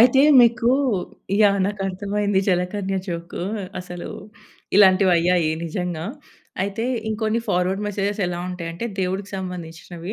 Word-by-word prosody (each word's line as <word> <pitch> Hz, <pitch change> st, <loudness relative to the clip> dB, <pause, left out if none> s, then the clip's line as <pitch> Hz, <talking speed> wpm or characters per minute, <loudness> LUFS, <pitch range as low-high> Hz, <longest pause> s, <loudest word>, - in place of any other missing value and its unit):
అయితే 255 Hz, +3 st, +6 dB, 0.2 s
మీకూ 235 Hz, 0 st, +4 dB, 0.7 s
యాహ్! 200 Hz, -1 st, +5 dB
నాకర్థమైంది. 200 Hz, 0 st, -1 dB
జలకన్య 190 Hz, +2 st, 0 dB
జోక్ 170 Hz, 0 st, -5 dB, 0.4 s
అసలు 180 Hz, -1 st, -7 dB, 0.7 s
ఇలాంటివయ్యాయి 180 Hz, -4 st, +5 dB
నిజంగా. 170 Hz, -1 st, -3 dB, 0.6 s
అయితే 200 Hz, +4 st, -2 dB, 0.2 s
ఇంకొన్ని 220 Hz, +1 st, 0 dB
ఫార్వర్డ్ 185 Hz, +3 st, +1 dB
మెసేజెస్ 205 Hz, 0 st, -2 dB
ఎలా 175 Hz, 0 st, -3 dB
ఉంటాయంటే 170 Hz, +2 st, -5 dB
దేవుడికి 190 Hz, +2 st, -2 dB
సంబంధించినవి. 175 Hz, 0 st, -7 dB
190 Hz, 100 wpm, -22 LUFS, 175-205 Hz, 0.7 s, అయితే